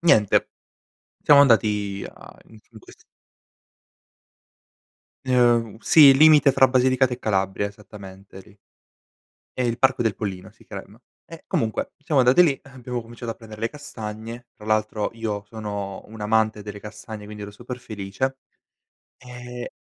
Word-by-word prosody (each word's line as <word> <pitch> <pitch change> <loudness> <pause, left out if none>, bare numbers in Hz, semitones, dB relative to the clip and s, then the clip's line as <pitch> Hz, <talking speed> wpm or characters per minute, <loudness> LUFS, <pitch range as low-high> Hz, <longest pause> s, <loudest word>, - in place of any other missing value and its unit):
niente, 110 - +3 0.8
siamo 145 -1 +7
andati 105 -6 +2
a - - -16
in 110 -1 -16
in 110 - -13
ques - - -18 2.2
Ehm, 120 -4 +2
sì, 160 - +4
il 135 -1 +8
limite 155 -1 +7
fra 135 0 +5
Basilicata, 130 0 +2
e 125 - -4
Calabria 95 -1 -1
esattamente 100 -2 -13
lì. 100 +2 -19 1.0
È - - -4
il 120 -1 0
parco 130 -2 +2
del 110 -3 0
Pollino 95 -3 -6
si - - -23
crem - - -10 0.3
e - - -12
comunque 110 -1 -2
siamo 145 -2 +1
andati 125 +8 +6
lì, 145 -6 +2
abbiamo 125 -3 -6
cominciato 115 0 -7
a - - -18
prender 110 -2 -13
le 115 - -1
castagne, 115 -4 -8
tra - - -14
l'altro 110 -1 0
io 110 -3 -4
sono 100 -3 -6
un 110 0 -12
amante 110 0 +1
delle 105 0 -8
castagne, 105 0 -9
quindi 105 0 -9
ero 100 - -7
super 120 +4 -8
felice 110 +4 -4 0.8
e 125 -1 -9
110 Hz, 145 wpm, -23 LUFS, 105-125 Hz, 2.2 s, il